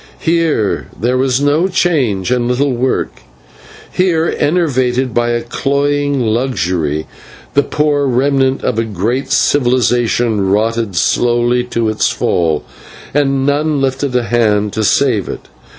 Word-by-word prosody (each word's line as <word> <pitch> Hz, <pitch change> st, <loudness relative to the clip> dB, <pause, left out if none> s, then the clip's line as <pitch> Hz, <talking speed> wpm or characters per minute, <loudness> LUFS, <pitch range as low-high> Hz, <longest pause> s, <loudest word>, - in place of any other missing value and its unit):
Here 160 Hz, -, 0 dB
there 120 Hz, +5 st, 0 dB
was 130 Hz, 0 st, +1 dB
no 145 Hz, +5 st, +2 dB
change 135 Hz, -, 0 dB
and 125 Hz, -1 st, +1 dB
little 130 Hz, +2 st, 0 dB
work; 125 Hz, +2 st, -2 dB, 0.7 s
here, 170 Hz, -3 st, +1 dB
enervated 130 Hz, -6 st, 0 dB
by 120 Hz, 0 st, +1 dB
a 120 Hz, 0 st, -1 dB
cloying 145 Hz, +2 st, -1 dB
luxury, 90 Hz, -, -1 dB, 0.5 s
the 140 Hz, -, +4 dB
poor 145 Hz, -1 st, 0 dB
remnant 135 Hz, +1 st, +1 dB
of 115 Hz, -, 0 dB
a -, -, +1 dB
great 115 Hz, +5 st, -2 dB
civilisation 120 Hz, -5 st, +1 dB
rotted 110 Hz, 0 st, 0 dB
slowly 120 Hz, +5 st, +1 dB
to 115 Hz, -2 st, -2 dB
its 110 Hz, 0 st, +1 dB
fall, 80 Hz, -3 st, 0 dB, 0.5 s
and 135 Hz, -2 st, +1 dB
none 145 Hz, +1 st, +1 dB
lifted 135 Hz, 0 st, -1 dB
a 125 Hz, -, +2 dB
hand 105 Hz, -3 st, +1 dB
to 110 Hz, -, -1 dB
save 115 Hz, -2 st, +1 dB
it. -, -, -8 dB
125 Hz, 130 wpm, -14 LUFS, 115-140 Hz, 0.7 s, the